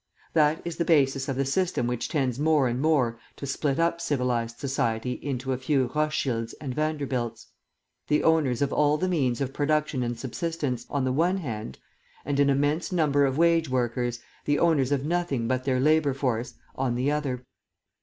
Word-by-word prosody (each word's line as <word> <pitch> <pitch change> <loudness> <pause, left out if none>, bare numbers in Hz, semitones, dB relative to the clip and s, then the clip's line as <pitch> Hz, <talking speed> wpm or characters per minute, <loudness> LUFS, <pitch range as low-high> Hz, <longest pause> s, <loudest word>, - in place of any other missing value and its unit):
That 155 0 +3
is 170 -1 -4
the 170 - +1
basis 140 -4 +2
of 135 - -1
the 135 +1 0
system 170 -2 0
which 120 -1 -2
tends 135 -4 0
more 150 -3 +3
and 120 +2 -2
more 130 -7 +2 0.2
to - - -7
split 140 0 -1
up 170 0 +1
civilised 125 -7 -1
society 125 -2 -1
into 130 -2 -2
a 130 - -3
few 130 -2 +1
Rothschilds 135 -7 -1
and 135 -4 -4
Vanderbilts, 140 -5 -2 0.6
the 150 - +2
owners 145 -6 +3
of 140 - -1
all 150 0 +3
the 185 - 0
means 140 -8 0
of 135 0 -2
production 150 -2 0
and 120 -1 -2
subsistence, 135 +1 -3
on 140 -2 -1
the 130 0 0
one 175 +7 +2
hand, 110 - -5 0.5
and 140 0 -1
an 140 0 +4
immense 145 +7 +1
number 145 -5 +3
of 135 +1 -2
wage 165 -2 +3
workers, 120 -1 -1 0.3
the 145 0 +2
owners 145 -6 +2
of 140 -1 0
nothing 155 -8 -1
but 130 0 -1
their 130 -2 +1
labour 150 0 +3
force, 125 -4 -2 0.2
on 130 -2 -1
the 130 +4 +1
other. 135 -4 -2
140 Hz, 185 wpm, -26 LUFS, 125-155 Hz, 0.6 s, an